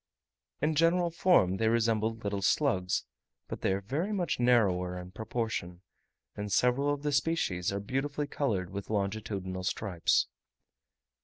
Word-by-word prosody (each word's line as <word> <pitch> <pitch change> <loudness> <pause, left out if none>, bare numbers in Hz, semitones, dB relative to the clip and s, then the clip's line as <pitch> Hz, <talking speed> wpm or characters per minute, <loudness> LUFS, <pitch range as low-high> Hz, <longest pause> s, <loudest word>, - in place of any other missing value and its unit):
In 155 +1 +2
general 170 +2 +3
form 160 - +3
they 110 - +1
resemble 115 -1 +2
little 100 -3 -3
slugs, 95 -5 +1 0.4
but - - -7
are 95 +1 +1
very 145 - -2
much 180 -9 -1
narrower 95 -8 +2
in 90 0 -8
proportion, 110 -5 -4 0.5
and 105 0 -5
several 125 +8 +3
of 145 0 -3
the 150 - 0
species 140 - 0
are 100 - -2
beautifully 135 +7 -2
coloured 105 -11 -2
with 100 0 -6
longitudinal 100 -3 -2
stripes. 90 -2 +1
110 Hz, 135 wpm, -30 LUFS, 95-145 Hz, 0.5 s, general